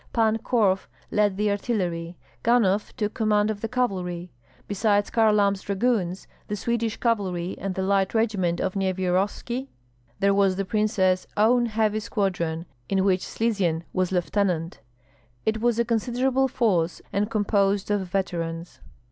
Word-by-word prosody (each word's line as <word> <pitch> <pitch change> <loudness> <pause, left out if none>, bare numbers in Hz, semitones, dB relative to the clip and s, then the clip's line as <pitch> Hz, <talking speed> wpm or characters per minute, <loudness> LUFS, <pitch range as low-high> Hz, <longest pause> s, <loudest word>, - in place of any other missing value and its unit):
Pan 225 -1 +2
Korf 205 -5 +1 0.2
led 205 -2 +2
the 210 0 +1
artillery; 180 -6 -2 0.2
Ganhoff 215 -4 +2
took 210 -3 -1
command 215 -1 +2
of 205 -1 -6
the 225 - -1
cavalry. 180 -8 -2 0.4
Besides, 205 0 +1
Kharlamp's 210 -3 +3
dragoons, 200 -3 -1 0.2
the 210 - -2
Swedish 230 +1 -1
cavalry, 190 -7 -1
and 195 -1 -3
the 190 - -1
light 195 +1 +1
regiment 200 -6 +1
of 190 - -1
Nyevyarovski, 190 +7 -1 0.5
there 200 0 +3
was 195 -1 +3
the 195 +1 -2
princess 190 -3 +1
own 240 +3 +4
heavy 215 -1 +1
squadron, 180 -6 -2 0.2
in 190 -1 +2
which 185 -2 +3
Slizyen 195 -8 0
was 185 -1 0
lieutenant. 180 -2 0 0.7
It 220 0 0
was 240 -1 +2
a 235 - +2
considerable 250 +3 +1
force, 185 -10 0
and 205 +2 0
composed 205 -2 +1
of 205 -1 +2
veterans. 170 -3 -3
200 Hz, 140 wpm, -25 LUFS, 185-220 Hz, 0.7 s, own